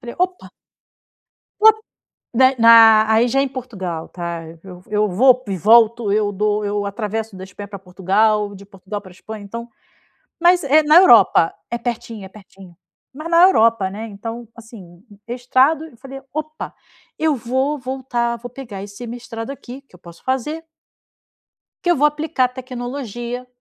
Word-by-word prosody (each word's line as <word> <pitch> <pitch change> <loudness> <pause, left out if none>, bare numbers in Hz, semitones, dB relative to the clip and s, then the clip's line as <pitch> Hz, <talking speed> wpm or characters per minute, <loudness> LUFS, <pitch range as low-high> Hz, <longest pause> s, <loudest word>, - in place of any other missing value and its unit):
fale: 240 -2 -9
"Opa!". 365 0 -2 1.1
Ó, 440 - +8 0.7
da 260 +2 +4
na 225 -1 +7
aí 230 +2 +3
já 270 +3 +1
é - - +3
em 275 - -1
Portugal, 195 -11 -6
tá, 170 -1 -6 0.2
eu 180 -2 -12
eu 210 0 +1
vou 250 +7 +4
e 195 - -2
volto, 225 +1 +4
eu 210 -1 +1
dou 210 +1 -1
eu 205 0 -2
atravesso 215 0 -4
da 185 - -8
Espanha 195 +2 -10
pra 200 -1 -8
Portugal, 200 +3 0
de 200 0 -12
Portugal 195 +1 -8
pra 185 - -15
Espanha, 215 +3 -10
então 235 +4 -8 0.7
mas, 350 0 +4
eh, 305 +3 +4
na 300 +2 +6
Europa 225 - +6 0.2
é 235 - -1
pertinho 230 -3 -5
é - - -12
pertinho, 190 -3 -16 0.4
mas 310 +5 -7
na 340 +1 +5
Europa, 230 - +4
né. 215 +4 -7
Então, 225 +3 -8
assim, 200 -7 -14 0.3
mestrado 255 +6 +1
eu 270 -7 -16
falei: 270 +2 -10
"Opa, 310 +1 -6 0.4
eu 315 -2 +1
vou 260 +5 -1
voltar, 255 -3 -3
vou 245 +2 -9
pegar 230 -7 -9
esse 205 +4 -9
mestrado 230 0 -7
aqui 270 -1 -10
que 275 - -23
eu 180 - -18
posso 170 -1 -15
fazer" 265 +5 -3 1.2
"que 350 - +1
eu 345 - +3
vou 295 +2 +4
aplicar 300 -3 0
tecnologia 250 -1 -6
230 Hz, 165 wpm, -19 LUFS, 205-260 Hz, 1.2 s, Ó